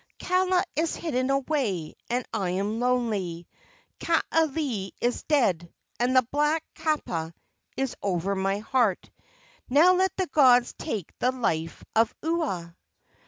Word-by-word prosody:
Kaala 365 0 +2
is 320 +1 0
hidden 260 -5 -1
away, 265 - -1 0.2
and 245 +1 -1
I 190 -3 -1
am 200 +5 -1
lonely; 215 -9 -1 0.5
Kaaialii 300 - 0
is 240 +1 0
dead, 190 - +1 0.3
and 250 +2 +1
the 255 - +6
black 300 +2 +1
kapa 175 - -2 0.4
is 270 -2 -1
over 195 0 -1
my 195 +1 0
heart: 220 -2 0 0.6
Now 315 +8 +6
let 375 0 +1
the 375 - +1
gods 255 -6 +4
take 200 -7 -4
the 250 - +2
life 165 -11 -2
of 225 +1 +3
Ua!" 275 - -2
250 Hz, 125 wpm, -26 LUFS, 195-305 Hz, 0.6 s, the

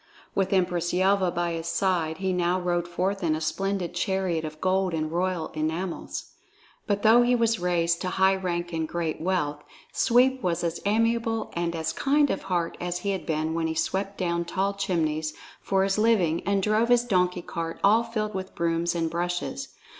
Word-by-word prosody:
With 190 -1 0
Empress 180 -3 +1
Yelva 190 0 +3
by 175 0 -1
his 165 0 -4
side, 170 -4 0
he 190 0 -1
now 180 +1 +1
rode 175 -1 -1
forth 185 +3 -1
in 160 -2 +2
a - - -3
splendid 185 +3 -2
chariot 180 -2 -1
of 155 0 -6
gold 185 -1 +1
and 155 -1 -2
royal 180 -1 -1
enamels. 160 +4 -3 0.6
But 205 -1 0
though 225 +2 +7
he 245 +1 +3
was 230 -2 +2
thus - - -11
raised 170 -1 +1
to 185 - -1
high 190 +1 +3
rank 175 -2 -3
and 160 -1 -1
great 165 -1 -3
wealth, 160 -5 -1 0.3
Sweep 260 +2 +3
was 175 -3 -1
as 170 0 -1
amiable 230 +1 +1
and 170 0 -2
as 160 0 -2
kind 285 - +2
of 195 - -2
heart 175 -3 -2
as 175 0 -2
he 200 - -1
had 190 - -4
been 160 0 -1
when 165 0 0
he 160 - -3
swept 195 +4 -1
down 170 -2 0
tall 195 +3 -1
chimneys 160 -5 -1 0.3
for 195 -1 +1
his 195 +1 +1
living 195 -8 +3
and 200 -1 +2
drove 215 +3 +2
his 245 -1 +5
donkey 180 -5 +1
cart 165 -1 -5
all 215 +4 +5
filled 215 -2 -3
with 190 0 -5
brooms 170 +1 0
and 165 -1 -1
brushes. 175 +10 -2
180 Hz, 190 wpm, -26 LUFS, 170-195 Hz, 0.6 s, though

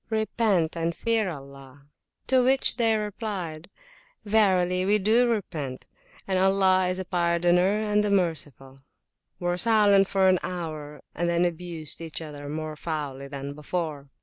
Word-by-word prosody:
repent 220 -6 0
and 165 0 -2
fear 225 -4 0
Allah! 140 -2 -11 0.4
They 255 -3 +3
replied, 200 -6 -5 0.6
Verily 185 -4 +2
we 205 +3 +3
do 225 +5 +3
repent, 155 - -4 0.4
and 190 -1 0
Allah 190 -1 +3
is 180 0 -1
a 190 - -4
Pardoner 175 +3 +2
and 210 0 +1
the 210 - 0
Merciful!were 160 - -4
silent 205 -2 +5
for 195 -1 +2
an 185 -1 +4
hour, 155 -4 -6
and 170 +1 -1
then 170 +1 +2
abused 170 -2 -3
each 165 -2 -4
other 145 -3 -8
more 155 +1 -5
foully 145 -4 -5
than 140 0 -6
before. 150 -2 -4
175 Hz, 130 wpm, -26 LUFS, 155-200 Hz, 0.6 s, silent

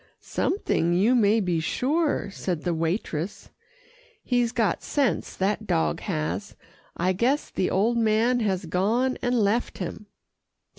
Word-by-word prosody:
"Something, 175 - 0
you 210 +8 +4
may 220 -2 +4
be 180 -5 0
sure," 285 - 0
said 180 -5 -3
the 175 - 0
waitress. 165 +1 -3 0.7
"He's 245 -2 +1
got 225 -4 0
sense, 280 -5 -1
that 205 +3 -1
dog 165 -3 +1
has. 180 +2 -3 0.4
I 185 +2 +1
guess 250 +10 0
the 185 - 0
old 225 +5 +2
man 225 +3 +2
has 190 -4 -1
gone 220 +10 0
and 245 -1 +1
left 220 +3 +1
him." 200 +3 -6
210 Hz, 135 wpm, -25 LUFS, 180-240 Hz, 0.7 s, you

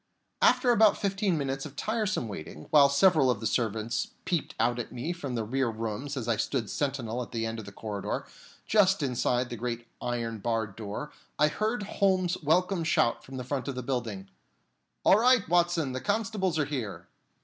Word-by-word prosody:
After 250 - +5
about 220 -3 +5
fifteen 195 -3 0
minutes 135 -1 -2
of 145 -2 -8
tiresome 215 - -1
waiting, 80 -6 -8
while 140 -2 +7
several 140 -1 +4
of 125 - +1
the 110 - -6
servants 110 0 0 0.2
peeped 170 -4 -1
out 120 +2 +2
at 120 - -5
me 125 +8 -3
from 140 -8 -5
the 115 - -1
rear 130 +3 0
rooms 115 +5 -4
as 120 -3 -3
I 115 -2 +1
stood 120 -3 -1
sentinel 125 -4 -2
at 120 - -7
the 115 -1 -2
end 115 0 -3
of 110 - -8
the 100 - -9
corridor, 100 -1 -4 0.4
just 195 -5 +3
inside 125 -1 0
the 120 - -4
great 120 0 -4 0.2
iron 115 -2 -2
barred 110 -2 -1
door, 110 +7 -6 0.3
I 150 +1 +4
heard 215 +5 -1
Holmes's 185 -3 +1
welcome 175 +4 +2
shout 115 -7 +2
from 130 +1 -9
the 125 - -4
front 130 -1 -3
of 140 - -3
the 125 - -4
building: 115 -7 -3 0.8
"All 200 - +7
right, 250 -2 +4
Watson; 175 -4 +2
the 130 0 -4
constables 205 -5 0
are 150 - +2
here!" 105 - -5
135 Hz, 190 wpm, -29 LUFS, 115-175 Hz, 0.8 s, while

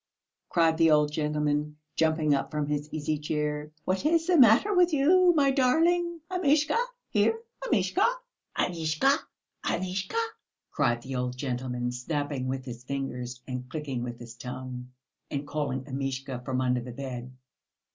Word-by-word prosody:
cried 165 -2 +3
the 165 -1 +6
old 150 -1 +4
gentleman, 150 0 -1 0.2
jumping 160 -2 +2
up 135 - 0
from 150 -1 -1
his 150 0 -2
easy 155 0 -1
chair. 150 0 -2 0.2
"What 185 +4 0
is 325 +2 +3
the 360 0 +3
matter 260 - +6
with 355 -2 +4
you, 350 +6 +5
my 280 -3 +4
darling? 330 +6 +2
Amishka! 305 -4 +2 0.4
here, 450 - +3 0.3
Amishka! - - +2 0.5
Amishka! 165 - +2 0.5
Amishka!" 185 - -2 0.5
cried 120 -4 +1
the 135 0 -5
old 125 0 -2
gentleman, 125 -2 -2
snapping 140 +1 -2
with 130 0 -3
his 120 -1 -8
fingers 125 -2 -4
and 125 -1 -5
clicking 140 -4 -4
with 120 -1 -5
his 120 -1 -10
tongue, 125 0 -7 0.4
and 145 0 -3
calling 145 -3 -2
Amishka 135 -1 -4
from 130 0 -1
under 125 -1 +1
the 125 +1 -7
bed. 125 -1 -6
150 Hz, 145 wpm, -28 LUFS, 130-185 Hz, 0.5 s, the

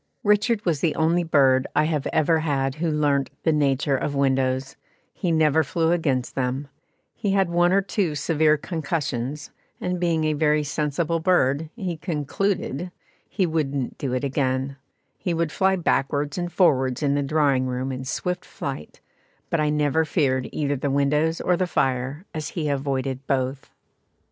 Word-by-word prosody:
Richard 210 +1 +2
was 165 -5 +1
the 160 0 +1
only 165 +2 +2
bird 135 -5 +3
I 150 - +4
have 155 -3 -1
ever 160 +1 +3
had 135 -4 0
who 160 +3 -2
learnt 145 -3 +1
the 160 - +3
nature 140 -1 +1
of 140 +2 -2
windows, 135 -1 0 0.4
he 180 - -2
never 160 -1 +3
flew 165 +3 0
against 140 -8 0
them; 130 +2 -2 0.4
he 200 -2 -1
had 195 -3 +2
one 175 +1 +3
or 195 +1 +3
two 185 -6 -1
severe 155 +1 +2
concussions, 145 -4 -3 0.3
and 180 0 -2
being 165 -2 +1
a 155 0 +1
very 150 0 +2
sensible 150 +3 -1
bird 160 -3 +2
he 185 -7 -4
"concluded" 170 +1 -2 0.4
he 195 - +1
wouldn't 145 -5 -2
do 135 - -2
it 130 - -1
again; 135 -1 -1 0.4
he 175 -3 -1
would 165 -2 0
fly 190 0 +2
backwards 145 -4 0
and 175 -1 -3
forwards 135 -7 +2
in 140 -1 +2
the 145 - +1
drawing 140 -3 +2
room 130 +1 -2
in 130 0 -5
swift 180 +7 -3
flight, 75 - -7 0.5
but 165 - +1
I 150 0 +2
never 150 +1 +2
feared 135 -5 0
either 145 -2 -1
the 140 +2 -2
windows 150 +4 +1
or 180 - +2
the 185 +1 0
fire, 135 +2 -1
as 155 -1 -4
he 155 -3 -2
avoided 135 -1 -2
both. 130 0 -1
150 Hz, 165 wpm, -24 LUFS, 135-165 Hz, 0.5 s, I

